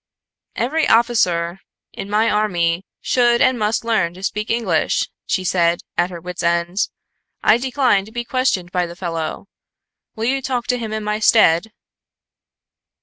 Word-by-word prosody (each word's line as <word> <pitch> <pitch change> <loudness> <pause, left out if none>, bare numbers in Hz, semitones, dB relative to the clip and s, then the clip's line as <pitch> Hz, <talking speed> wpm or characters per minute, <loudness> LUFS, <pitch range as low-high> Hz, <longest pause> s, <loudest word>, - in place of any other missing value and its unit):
"Every 310 +7 0
officer 190 -7 +2 0.3
in 195 - -7
my 215 +2 +2
army 180 -5 0
should 240 -1 +2
and 255 -2 +3
must 215 +2 0
learn 190 -7 0
to 185 - -12
speak 210 +2 -2
English," 220 -9 0 0.2
she 185 - 0
said, 170 -1 +1
at 175 +1 +1
her 175 -2 -8
wits' 180 +1 -6
end, 170 +1 0 0.7
"I 225 - +5
decline 250 -6 +1
to 220 - -14
be 240 +1 -4
questioned 235 -9 0
by 180 -1 0
the 170 - -10
fellow. 165 -1 -4 0.7
Will 225 0 -3
you 270 +3 0
talk 250 -2 -2
to 250 - +1
him 225 -2 -5
in 215 0 -3
my 210 0 -1
stead?" 215 -3 +4
210 Hz, 155 wpm, -20 LUFS, 175-235 Hz, 0.7 s, I